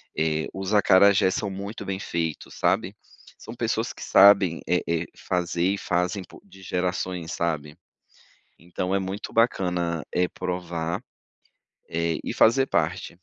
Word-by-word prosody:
eh, 80 0 0
os 95 +2 -4
acarajés, 100 -1 +5
são 100 - -2
muito 100 +3 -6
bem 95 0 -4
feitos, 80 -5 -4
sabe, - - 0 0.4
são - - -9
pessoas - - -1
que - - -10
sabem, 95 -4 +6
eh 90 - +2
eh, 85 0 0
fazer 90 +1 0
e - - -3
fazem, 90 +2 -1 0.2
de 95 - -17
gerações 90 -2 -2
sabe. 75 -3 -2 0.8
Então, 90 +2 -3
é 100 - +3
muito 95 +2 -5
bacana, 90 -8 +1
eh, 90 0 +2
provar, 90 +1 -4 0.9
eh, 85 0 -1
e - - -3
fazer 135 +4 +4
parte. 85 +2 -1
90 Hz, 135 wpm, -25 LUFS, 85-95 Hz, 0.9 s, sabem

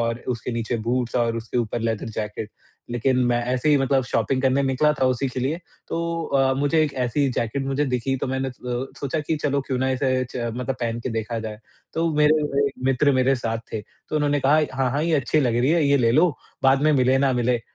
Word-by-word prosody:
और 115 0 -1
उसके 125 0 -2
नीचे 115 +1 -2
बूट्स 125 -1 0
और 115 -1 +1
उसके 115 +2 -3
ऊपर 120 0 -2
लेदर 115 0 -2
जैकेट। 105 0 -4 0.4
लेकिन 125 +2 +1
मैं 120 0 +2
ऐसे 130 +4 0
ही 150 - +6
मतलब 135 -1 +2
शॉपिंग 125 +2 0
करने 135 +1 +3
निकला 135 +3 +2
था - - +4
उसी 130 +1 +1
के 130 0 -4
लिए, 140 +6 -1 0.3
तो 170 0 -2
अ, 135 -1 +2
मुझे 145 +4 +2
एक 150 -2 -1
ऐसी 135 +4 +1
जैकेट 120 +4 -2
मुझे 135 +2 0
दिखी, 130 0 -1
तो 130 - -3
मैंने 130 0 -1
अ, - - -8 0.5
सोचा 140 +3 -1
कि 155 +1 -1
चलो 140 -1 +1
क्यों 130 -2 -1
ना 130 +1 +1
इसे 130 -1 +1
च - - -7 0.2
मतलब 125 +1 -2
पहन 115 0 -2
के 125 - -4
देखा 115 +1 -3
जाए? 110 -1 -6 0.4
तो 165 +1 +1
मेरे 150 +1 +4 0.2
एक 140 - -2
मित्र 135 +2 +3
मेरे 130 +1 +3
साथ 115 -1 -2
थे, 110 - -2
तो 155 - -8
उन्होंने 145 -1 +1
कहा, 135 +2 +4 0.2
"हाँ, 130 -1 +1
हाँ 145 +4 0
ये 165 0 +1
अच्छी 145 +4 +1
लग 120 -4 +1
रही 125 +4 +2
है 165 -1 +3
ये 140 - +4
ले 120 -4 +3
लो, 155 +2 +4 0.3
बाद 135 +1 +4
में 155 0 +4
मिले 130 -1 +3
ना 135 -1 +2
मिले, 120 -1 +1
130 Hz, 235 wpm, -23 LUFS, 120-140 Hz, 0.5 s, ही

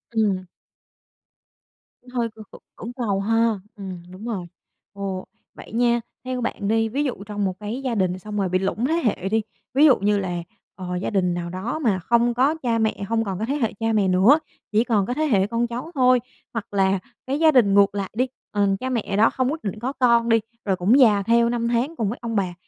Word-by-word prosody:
Ừm. 195 -4 +1 1.6
Cũng 250 - -17
hơi 240 -2 -1
cưỡng 220 - -10
c - - -15 0.2
cưỡng 240 +2 -7
cầu 220 -6 -1
ha. 225 0 +1 0.2
Ừm, 185 -4 -7
đúng 190 +4 -10
rồi. 195 -7 -3 0.5
Ồ, 195 -2 -4 0.3
vậy - - -12
nha, 240 0 +2 0.2
theo 255 -1 -3
bạn 210 -4 -3
đi, 225 +1 +2
ví 280 +6 -1
dụ 245 -7 -3
trong 205 -1 -2
một 185 - -1
cái 220 +6 -4
gia 245 -3 -1
đình 185 -2 0
xong 210 +2 -6
rồi 190 -2 0
bị 185 +1 +1
lủng 200 +5 -1
thế 315 - +1
hệ 195 -3 0
đi, 220 +1 +2 0.3
ví 285 +3 +5
dụ 275 -5 +7
như 205 +1 +2
là, 175 -3 -3 0.3
ờ, 180 -1 -5
gia 180 - -2
đình 180 -4 +1
nào 175 0 -4
đó 195 - -4
mà 210 -10 +1
không 235 +5 +2
có 270 +6 +2
cha 230 -2 +1
mẹ, 220 -2 0
hông 225 0 +1
còn 195 -2 -4
có 220 - -1
thế 275 +4 -1
hệ 230 -8 -1
cha 225 0 0
mẹ 205 -3 +2
nữa, 195 +12 +5 0.3
chỉ 215 +2 +3
còn 210 -5 +1
có 245 - -2
thế 310 +4 0
hệ 200 -9 +2
con 235 +2 0
cháu 245 +8 -6
thôi. 255 -1 +5 0.3
Hoặc 220 -3 -5
là 195 -1 +2 0.3
cái 280 +3 -1
gia 320 -1 +6
đình 225 -8 +4
ngược 200 0 +4
lại 195 -2 -2
đi, 255 +4 +1 0.2
ừm, 200 -2 +1
cha 260 +4 -4
mẹ 220 -5 -2
đó 220 - +5
không 255 +1 0
quyết 325 - -5
định 210 +1 -4
có 260 +4 -3
con 235 -3 +3
đi, 225 0 +5 0.3
rồi 195 - +1
cũng 205 +10 +3
già 210 -5 +5
theo 235 +2 +3
năm 235 -1 -1
tháng 245 +7 0
cùng 215 -7 -1
với 240 - -4
ông 230 -1 -3
bà, 190 -4 0
220 Hz, 235 wpm, -23 LUFS, 195-240 Hz, 1.6 s, dụ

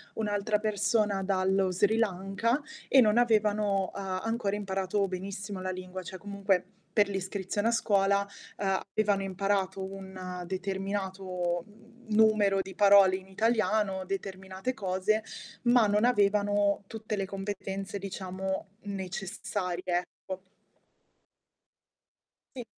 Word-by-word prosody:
un'altra 210 -1 0
persona 210 -1 +1
dallo 190 0 +2
Sri 205 +5 +2
Lanka, 210 +5 0 0.3
e 265 - +7
non 215 0 +4
avevano 210 -4 +2
a 190 -1 -3
ancora 225 -3 -1
imparato 195 0 -1
benissimo 195 +1 -5
la 185 0 -2
lingua, 185 0 -6
cioè 185 +2 -7
comunque, 200 -2 0 0.3
per 205 -1 +5
l'iscrizione 195 +2 -2
a - - +4
scuola 200 -3 +2 0.3
avevano 195 +1 0
imparato 195 0 -1
un 190 -2 -7
determinato, 190 -2 -2
mhmm, 230 +3 -20
numero 215 -3 +5
di 190 0 -8
parole 200 -2 +6
in 190 0 -13
italiano, 210 -2 +1
determinate 190 +3 -4
cose, 195 +2 0 0.4
ma 240 -2 +5
non 210 +3 +3
avevano 205 -2 +3
tutte 220 -1 -4
le 195 -1 -1
competenze, 195 0 -4
diciamo, 190 0 -4 0.2
necessarie, 190 -1 -4
ecco. 185 +1 -4 2.1
Sì. 245 - -4
195 Hz, 110 wpm, -29 LUFS, 190-210 Hz, 2.1 s, e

